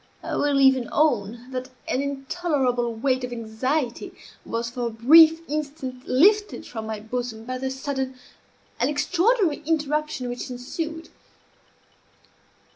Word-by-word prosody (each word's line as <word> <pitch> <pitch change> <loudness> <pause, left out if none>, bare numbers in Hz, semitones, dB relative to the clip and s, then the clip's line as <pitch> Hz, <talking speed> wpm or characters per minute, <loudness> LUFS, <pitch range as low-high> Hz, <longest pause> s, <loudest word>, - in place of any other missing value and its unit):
I - - -3
will 290 -1 +2
even 265 -2 +4
own 240 -4 0
that 255 0 -4 0.2
an 260 - 0
intolerable 270 -3 -1
weight 255 +2 0
of 250 - -4
anxiety 240 +3 -2 0.3
was 230 +1 -2
for 245 -1 -2
a - - -2
brief 320 +8 +6
instant 280 -4 -5
lifted 410 +10 +3
from 220 -2 -6
my 220 -1 -4
bosom 225 0 -5
by 255 +1 -4
the 265 0 -2
sudden 265 -1 -3 0.6
and - - +2
extraordinary 345 - +2
interruption 300 -3 -1
which 245 +1 -5
ensued. 315 +6 -5
265 Hz, 125 wpm, -24 LUFS, 245-305 Hz, 0.6 s, brief